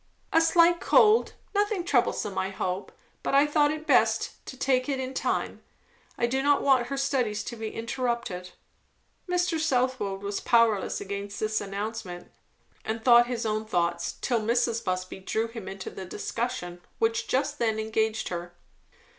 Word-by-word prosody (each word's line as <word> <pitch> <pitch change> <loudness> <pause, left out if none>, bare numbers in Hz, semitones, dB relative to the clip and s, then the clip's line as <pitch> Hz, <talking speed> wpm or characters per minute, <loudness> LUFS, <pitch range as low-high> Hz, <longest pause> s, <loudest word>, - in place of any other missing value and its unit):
"A 325 - +6
slight 335 +1 +5
cold 435 +2 +4 0.2
nothing 410 -2 +1
troublesome, 245 - +1
I 190 - -1
hope; 190 0 -3 0.3
but - - -1
I 280 +1 +6
thought 300 +1 +1
best 225 -6 +2
to 260 - -8
take 255 +1 +1
it 270 -2 -1
in 260 0 -4
time. - - -2 0.6
I - - +2
do 265 +3 0
not 285 +1 +3
want 260 -3 +4
her 275 - -3
studies 250 -7 0
to 240 - -6
be 220 -1 -4
interrupted." 230 -6 -3 0.8
Mr. 355 -2 +1
Southwode 250 -9 0
was 200 0 -2
powerless 230 -4 +2
against 200 +1 -5
this 215 0 0
announcement, 200 -2 -5 0.5
and 220 0 -4
thought 240 -1 +7
his 240 -2 -3
own 215 0 0
thoughts, 170 -3 -1
till 240 -3 +1
Mrs. 235 +1 +1
Busby 185 +1 -3
drew 220 +4 -1
him 225 -4 -9
into 190 0 -6
the 190 - -7
discussion 205 -2 -4 0.2
which 230 +1 0
just 290 +3 0
then 225 -2 +1
engaged 220 0 -1
her. 175 0 -6
230 Hz, 155 wpm, -27 LUFS, 200-265 Hz, 0.8 s, thought